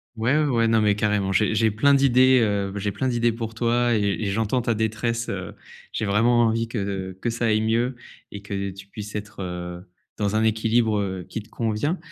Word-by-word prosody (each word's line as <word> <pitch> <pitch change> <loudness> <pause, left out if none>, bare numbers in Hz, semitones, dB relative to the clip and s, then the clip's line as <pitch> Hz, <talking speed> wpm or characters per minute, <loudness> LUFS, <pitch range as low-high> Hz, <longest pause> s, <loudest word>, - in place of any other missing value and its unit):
Ouais, 120 +7 +1
ouais, 155 - +2
ouais. 115 -4 +2
Non 115 0 +3
mais 105 -1 +3
carrément 105 -2 0
j'ai 105 +3 +2
j'ai 110 0 +3
plein 140 +7 +4
d'idées 130 -1 +5
heu, 100 -3 0
j'ai 105 0 -2
plein 130 - -2
d'idées 120 -1 +1
pour 115 -1 -6
toi 120 0 +2
et - - +2 0.2
et - - -1
j'entends 110 +5 0
ta 115 -1 0
détresse, 115 +2 -1
heu, - - -5 0.4
j'ai 110 - -2
vraiment 115 +4 +3
envie 115 0 +1
que 95 -4 -4
que 120 - -1
ça 115 0 -2
aille 110 -1 +2
mieux 120 +3 0 0.4
et 100 -1 -8
que 100 -1 -3
tu 100 +1 -11
puisses 105 +1 -8
être, 105 0 -6
heu, 90 0 -6 0.4
dans 105 0 0
un 110 - +2
équilibre, 110 0 +2
heu, 95 -3 -3
qui 110 - -5
te 110 - -18
convient. 115 - -1
110 Hz, 215 wpm, -24 LUFS, 100-120 Hz, 0.4 s, d'idées